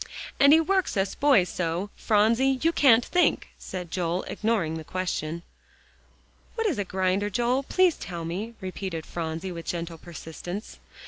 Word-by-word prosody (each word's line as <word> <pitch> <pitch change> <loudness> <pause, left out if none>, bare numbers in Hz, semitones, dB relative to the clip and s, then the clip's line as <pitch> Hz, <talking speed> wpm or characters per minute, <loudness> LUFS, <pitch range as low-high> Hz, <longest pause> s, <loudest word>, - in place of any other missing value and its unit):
"And 280 +1 +7
he 315 - +8
works 375 - +1
us 195 0 0
boys 270 -11 +4
so, 180 +4 -2
Phronsie 230 +5 +3
you 330 - +4
can't 245 -7 +5
think," 355 -1 +2
said 180 -3 -6
Joel, 175 0 -1
ignoring 200 -8 -1
the - - -8
question. 170 -1 -3 1.1
"What 455 -1 -1
is 340 - 0
a - - +1
grinder, 190 +2 0
Joel, 240 +5 +1
please 360 +4 +2
tell 170 -1 -6
me," 205 +8 -4
repeated 185 -3 -5
Phronsie 165 +2 -4
with 170 -1 -8
gentle 170 -1 -4
persistence. 175 +4 -8
190 Hz, 150 wpm, -26 LUFS, 170-245 Hz, 1.1 s, he